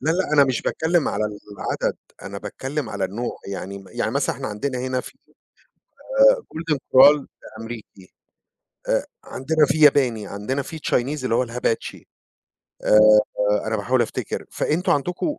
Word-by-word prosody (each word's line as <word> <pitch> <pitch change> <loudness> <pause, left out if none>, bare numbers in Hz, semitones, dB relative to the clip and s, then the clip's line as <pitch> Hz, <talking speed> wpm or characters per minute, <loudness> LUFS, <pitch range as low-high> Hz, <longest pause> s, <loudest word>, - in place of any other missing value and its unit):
لا 155 - 0
لأ، 175 -2 0
أنا 145 -2 +6
مش 130 -3 -1
باتكلم 160 -1 +1
على 105 - -1
العدد، 105 -1 -4 0.3
أنا - - -7
باتكلم 135 -1 -5
على 100 -2 -2
النوع 110 +6 -4
يعني 100 0 -6
يعني - - -2
مثلًا - - -1
إحنا - - -5
عندنا 125 +5 -3
هنا 130 0 -2
في - - -11 1.1
آآ - - +9 0.3
Golden 160 -2 -1
Coral 140 +2 +5 0.3
أمريكي، 110 -5 -10 0.8
آآ - - +1 0.2
عندنا 155 +3 +1
في 155 - 0
ياباني، 125 -8 +4
عندنا 105 +9 -3
في 160 +4 -8
Chinese 140 -1 -1
اللي 115 -2 +1
هو 125 +1 +2
الHibachi. 115 -1 -3 0.8
آآ 105 - +5 0.7
أنا 110 0 0
باحاول 120 +5 +1
أفتكر. 115 - -4
فأنتم 170 +5 0
عندكو 180 - -2
130 Hz, 150 wpm, -22 LUFS, 110-150 Hz, 1.1 s, آآ